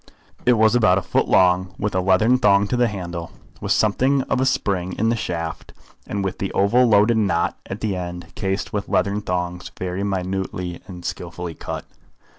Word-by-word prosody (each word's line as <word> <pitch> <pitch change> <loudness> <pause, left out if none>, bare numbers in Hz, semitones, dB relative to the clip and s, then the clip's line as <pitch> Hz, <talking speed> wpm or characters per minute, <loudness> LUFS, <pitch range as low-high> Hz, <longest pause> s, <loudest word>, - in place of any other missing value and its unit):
It 125 - +7
was 110 -1 +4
about 110 -6 +4
a 95 - -1
foot - - +1
long, 95 0 +3
with 105 -1 -2
a 95 - +1
leathern 110 +7 +3
thong 100 -3 +4
to - - 0
the 120 0 +3
handle, 90 -5 -5 0.3
with - - -3
something 130 +6 +2
of 130 - -1
a 130 - +2
spring 95 -6 0
in 110 +2 0
the 115 - +2
shaft, 85 -6 -4 0.3
and 100 -1 -2
with 95 - -3
the 95 - -2
oval 120 +6 +4
loaded 110 +1 +4
knot 95 -6 +1
at 100 - -6
the 105 -3 -1
end 90 -2 -6
cased 95 +1 -3
with 100 -1 -3
leathern 100 +1 +1
thongs 90 -2 -3
very 90 +2 -3
minutely 95 -2 -3
and 90 -2 -9
skilfully 90 -2 -5
cut. - - -6
95 Hz, 190 wpm, -22 LUFS, 90-110 Hz, 0.3 s, It